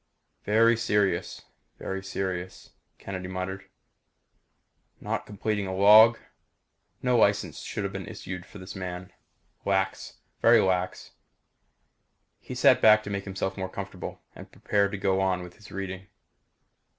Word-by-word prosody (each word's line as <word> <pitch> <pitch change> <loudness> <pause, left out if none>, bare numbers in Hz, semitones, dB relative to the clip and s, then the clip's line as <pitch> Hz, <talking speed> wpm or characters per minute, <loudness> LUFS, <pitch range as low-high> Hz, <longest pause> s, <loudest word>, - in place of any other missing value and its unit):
"Very 115 +3 +4
serious 105 -3 0 0.3
very 95 0 -5
serious," 95 -2 -5 0.3
Kennedy 95 -2 -6
muttered. 95 +1 -5 1.3
"Not - - -4
completing 105 -1 -2
a 95 - -3
log. 110 +4 +8 0.9
No 125 -1 +2
license 105 -3 +2
should - - -5
have - - -3
been - - -6
issued 90 0 -7
this 95 -2 -9
man. 90 0 -6 0.5
Lax! 95 -1 -1 0.2
Very 115 0 +6
lax." 95 -2 -1 1.3
He - - -8
sat - - +5
back 110 0 +6
to 100 - -6
make 100 -1 -3
himself 95 0 -3
more 95 -1 -3
comfortable 95 -1 -7
and - - -12
prepared 100 -1 0
to - - -2
go 95 0 +1
on 95 -2 0
with 90 0 -12
his 105 - -15
reading. 95 -1 -6
95 Hz, 130 wpm, -27 LUFS, 95-105 Hz, 1.3 s, log